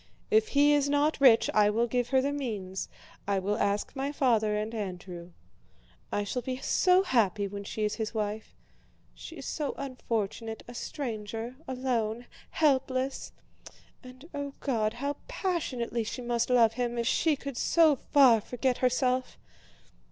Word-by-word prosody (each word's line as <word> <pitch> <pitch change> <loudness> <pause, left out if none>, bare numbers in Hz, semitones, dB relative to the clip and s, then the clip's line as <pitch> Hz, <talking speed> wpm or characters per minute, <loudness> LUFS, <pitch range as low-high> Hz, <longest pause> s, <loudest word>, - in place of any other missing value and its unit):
If 435 0 +4
he 290 +1 +6
is 285 -1 +2
not 290 +1 +1
rich 245 -5 +6
I 210 -1 +5
will 230 +3 +1
give 245 0 -1
her 265 0 +3
the 280 - 0
means; 210 -10 -4 0.4
I 200 -1 +1
will 205 +3 -1
ask 205 +5 -1
my 275 +1 -2
father 225 -7 +2
and 215 +2 -3
Andrew. 180 -4 -6 0.8
I 205 - 0
shall 245 +5 -3
be 255 0 -4
so 365 +7 +3
happy 215 - +1
when 200 +1 -7
she 215 - -4
is 210 - -1
his 215 - -2
wife. 215 -1 -4 0.6
She - - -10
is - - -9
so 295 -3 -3
unfortunate, 225 -4 -4
a 240 - -9
stranger, 230 -2 -5
alone, 245 -3 -2 0.2
helpless! 265 -3 0 0.7
And, 255 +4 -13
oh 285 -1 -5
God, 220 -6 0
how 280 +4 -3
passionately 285 - -2
she 245 +3 -5
must 240 0 0
love 235 -3 +5
him 240 0 -2
if 235 - -1
she 315 +5 +2
could 275 -1 -7
so 320 +3 +4
far 255 -5 +5
forget 250 +3 -1
herself! 255 0 +1
245 Hz, 155 wpm, -29 LUFS, 215-275 Hz, 0.8 s, he